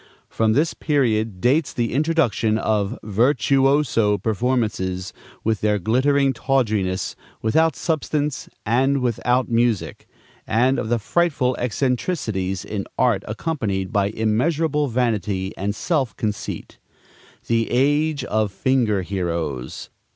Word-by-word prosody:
From 110 Hz, -1 st, +1 dB
this 150 Hz, +6 st, +2 dB
period 110 Hz, -, 0 dB
dates 135 Hz, -, +2 dB
the 120 Hz, -2 st, -1 dB
introduction 135 Hz, -8 st, +1 dB
of 110 Hz, 0 st, 0 dB
virtuoso 125 Hz, 0 st, +2 dB
performances 105 Hz, -4 st, -1 dB, 0.3 s
with 110 Hz, -2 st, 0 dB
their 105 Hz, -1 st, +2 dB
glittering 135 Hz, +7 st, +2 dB
tawdriness, 110 Hz, -8 st, 0 dB, 0.3 s
without 160 Hz, +9 st, +3 dB
substance 150 Hz, -3 st, -2 dB, 0.2 s
and 135 Hz, +5 st, +2 dB
without 125 Hz, +1 st, +1 dB
music, 115 Hz, -3 st, 0 dB, 0.4 s
and 125 Hz, +4 st, +2 dB
of 110 Hz, -, -3 dB
the 120 Hz, -, +2 dB
frightful 130 Hz, 0 st, +1 dB
eccentricities 120 Hz, -, -1 dB
in 100 Hz, -2 st, -4 dB
art, 115 Hz, -6 st, +2 dB
accompanied 110 Hz, -, -2 dB
by 100 Hz, -2 st, +2 dB
immeasurable 145 Hz, +8 st, 0 dB
vanity 105 Hz, -6 st, -1 dB
and 100 Hz, +2 st, -2 dB
self 140 Hz, 0 st, -1 dB
conceit, 105 Hz, -5 st, -4 dB, 0.7 s
the 115 Hz, -1 st, +1 dB
age 145 Hz, +2 st, +2 dB
of 110 Hz, -4 st, 0 dB
"finger 115 Hz, -4 st, +1 dB
heroes." 85 Hz, -9 st, -4 dB
115 Hz, 110 wpm, -22 LUFS, 105-135 Hz, 0.7 s, without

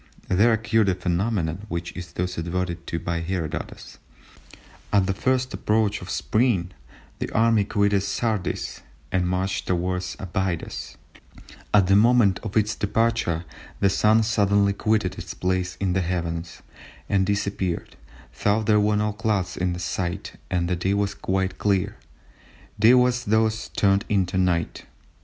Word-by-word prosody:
there 105 Hz, +6 st, +4 dB
occurred 110 Hz, -2 st, +2 dB
a 90 Hz, -, +1 dB
phenomenon 90 Hz, 0 st, -1 dB
which 85 Hz, 0 st, -4 dB
is 90 Hz, -2 st, -7 dB
thus 90 Hz, +1 st, -2 dB
adverted 85 Hz, 0 st, -3 dB
to 85 Hz, -, -2 dB
by 85 Hz, +1 st, -2 dB
Herodotus—"At 90 Hz, +3 st, -5 dB
the 95 Hz, -, 0 dB
first 130 Hz, +4 st, 0 dB
approach 105 Hz, -1 st, +1 dB
of 90 Hz, -, -9 dB
Spring 110 Hz, -7 st, +1 dB, 0.5 s
the -, -, -3 dB
army 110 Hz, -2 st, +3 dB
quitted 100 Hz, -1 st, +2 dB
Sardis 105 Hz, -2 st, -2 dB, 0.3 s
and 90 Hz, -1 st, +1 dB
marched 95 Hz, +1 st, -1 dB
towards 90 Hz, 0 st, -1 dB
Abydos; 95 Hz, -2 st, -3 dB, 0.7 s
at 100 Hz, -3 st, +5 dB
the 95 Hz, +2 st, +4 dB
moment 110 Hz, -3 st, +4 dB
of 110 Hz, -1 st, -3 dB
its 105 Hz, 0 st, +2 dB
departure 105 Hz, -6 st, 0 dB, 0.3 s
the 100 Hz, -, +3 dB
Sun 110 Hz, +3 st, +4 dB
suddenly 100 Hz, -2 st, +2 dB
quitted 105 Hz, -2 st, 0 dB
its 85 Hz, 0 st, -7 dB
place 90 Hz, 0 st, -1 dB
in 95 Hz, -2 st, 0 dB
the 95 Hz, -, +1 dB
heavens 85 Hz, -1 st, -3 dB, 0.4 s
and 100 Hz, -2 st, +2 dB
disappeared 100 Hz, -3 st, -2 dB, 0.5 s
though 105 Hz, +2 st, +3 dB
there 105 Hz, 0 st, +4 dB
were 105 Hz, 0 st, +2 dB
no 105 Hz, 0 st, 0 dB
clouds 105 Hz, -4 st, -1 dB
in 90 Hz, -1 st, -1 dB
sight 90 Hz, +2 st, -3 dB, 0.2 s
and 90 Hz, -2 st, 0 dB
the 90 Hz, -, 0 dB
day 95 Hz, +3 st, 0 dB
was 100 Hz, -1 st, 0 dB
quite 95 Hz, -1 st, -2 dB
clear; 100 Hz, -3 st, +1 dB, 0.8 s
day 115 Hz, +4 st, +7 dB
was 125 Hz, 0 st, +2 dB
thus 110 Hz, +1 st, +1 dB
turned 100 Hz, 0 st, +2 dB
into 95 Hz, -3 st, +1 dB
night." 90 Hz, -3 st, 0 dB
95 Hz, 145 wpm, -24 LUFS, 90-105 Hz, 0.8 s, day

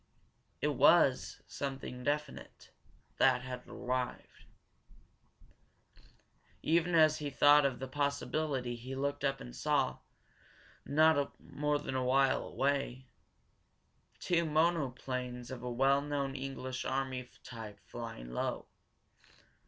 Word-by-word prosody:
It -, -, +2 dB
war, -, -, +6 dB, 0.3 s
something 135 Hz, -2 st, -5 dB
definite, 145 Hz, +1 st, -4 dB, 0.5 s
that 125 Hz, -2 st, +4 dB
had 125 Hz, -1 st, -7 dB
arrived. 125 Hz, 0 st, -4 dB, 2.2 s
Even 170 Hz, +2 st, +2 dB
as 155 Hz, -1 st, +5 dB
he 145 Hz, -1 st, -3 dB
thought 145 Hz, +1 st, +6 dB
of 130 Hz, -, -4 dB
the 135 Hz, -, -5 dB
possibility 140 Hz, -2 st, -1 dB
he 125 Hz, +3 st, -7 dB
looked 140 Hz, +2 st, -2 dB
up 135 Hz, -1 st, 0 dB
and -, -, -9 dB
saw, -, -, +1 dB, 0.9 s
not 150 Hz, -1 st, +3 dB
more 150 Hz, 0 st, -1 dB
than 145 Hz, -2 st, -5 dB
a 130 Hz, -, +1 dB
mile 135 Hz, +1 st, +3 dB
away, 135 Hz, -2 st, -1 dB, 1.1 s
two 170 Hz, -1 st, +1 dB
monoplanes 130 Hz, -6 st, -1 dB
of 130 Hz, -, -6 dB
a 125 Hz, -, -4 dB
well 135 Hz, +3 st, +3 dB
known 140 Hz, -2 st, -2 dB
English 130 Hz, -1 st, -4 dB
army 130 Hz, -1 st, -2 dB
type 110 Hz, -4 st, -9 dB
flying 115 Hz, -, -7 dB
low. -, -, -2 dB
135 Hz, 110 wpm, -33 LUFS, 125-145 Hz, 2.2 s, war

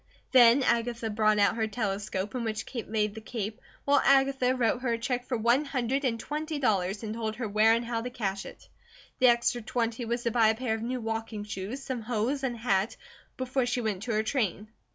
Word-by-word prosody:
Then 250 Hz, +1 st, +7 dB
Agatha 235 Hz, -2 st, 0 dB
brought 215 Hz, 0 st, +3 dB
out 205 Hz, +2 st, +3 dB
her 220 Hz, -1 st, +1 dB
telescope, 205 Hz, -2 st, -3 dB
in 250 Hz, -2 st, -2 dB
which 220 Hz, -1 st, -3 dB
Kate 235 Hz, -3 st, -6 dB
laid 210 Hz, -1 st, 0 dB
the 220 Hz, -, -8 dB
cape 220 Hz, 0 st, -5 dB, 0.2 s
while 285 Hz, -1 st, +4 dB
Agatha 270 Hz, -2 st, +3 dB
wrote 240 Hz, 0 st, +1 dB
her 245 Hz, -2 st, 0 dB
a -, -, 0 dB
check 245 Hz, +1 st, -2 dB
for 250 Hz, -, -1 dB
one 235 Hz, +6 st, +3 dB
hundred 270 Hz, -1 st, -1 dB
and 230 Hz, -4 st, 0 dB
twenty 305 Hz, +3 st, -4 dB
dollars, 200 Hz, -6 st, 0 dB
and 215 Hz, -1 st, -3 dB
told 220 Hz, -1 st, -3 dB
her 235 Hz, 0 st, -3 dB
where 215 Hz, +2 st, +4 dB
and 235 Hz, +1 st, -2 dB
how 230 Hz, -1 st, -2 dB
to 245 Hz, -, -4 dB
cash 200 Hz, -6 st, -3 dB
it. -, -, -13 dB, 0.5 s
The 255 Hz, -, +6 dB
extra 240 Hz, 0 st, +3 dB
twenty 230 Hz, +1 st, -2 dB
was 235 Hz, +1 st, -2 dB
to 235 Hz, -, 0 dB
buy 225 Hz, -1 st, +4 dB
a 220 Hz, -, +3 dB
pair 240 Hz, -1 st, -2 dB
of 220 Hz, -, -3 dB
new 250 Hz, +2 st, -2 dB
walking 225 Hz, -1 st, -4 dB
shoes, 210 Hz, +5 st, -6 dB
some 255 Hz, -3 st, -4 dB
hose, 240 Hz, +5 st, -1 dB
and 250 Hz, -2 st, -1 dB
a -, -, -10 dB
hat, 215 Hz, -2 st, 0 dB, 0.4 s
before 255 Hz, 0 st, -1 dB
she 245 Hz, 0 st, 0 dB
went 210 Hz, -5 st, -2 dB
to 230 Hz, +1 st, -3 dB
her 215 Hz, 0 st, +1 dB
train. 215 Hz, -4 st, -1 dB
230 Hz, 225 wpm, -28 LUFS, 215-250 Hz, 0.5 s, Then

